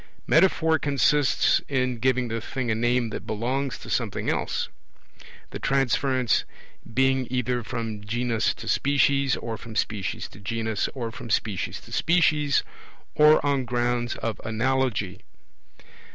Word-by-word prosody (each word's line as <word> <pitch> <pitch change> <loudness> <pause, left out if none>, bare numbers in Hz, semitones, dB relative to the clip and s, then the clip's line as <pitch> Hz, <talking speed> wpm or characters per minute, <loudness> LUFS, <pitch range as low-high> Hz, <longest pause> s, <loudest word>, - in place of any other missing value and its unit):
Metaphor 160 -2 +4
consists 145 0 +3
in 125 -3 0
giving 125 0 +1
the 115 0 -3
thing 125 0 -3
a - - +3
name 120 +1 +1
that - - -6
belongs 125 +5 -2
to - - -11
something - - -1
else; - - -2 0.8
the - - -6
transference 135 -2 +1 0.5
being 130 +1 +2
either 125 -1 -1
from 115 -3 -5
genus 115 +1 0
to - - -9
species, 140 -1 +2
or 115 -1 -5
from 110 +1 -10
species 105 -3 -2
to - - -14
genus, 110 +1 -2
or 120 -3 -4
from 120 +1 -9
species 100 -3 -1
to - - -15
species, 155 -4 +2 0.5
or 150 -1 +5
on 140 -2 +1
grounds 120 0 -1
of 115 -3 -4
analogy. 110 -4 -1
125 Hz, 135 wpm, -25 LUFS, 115-135 Hz, 0.8 s, or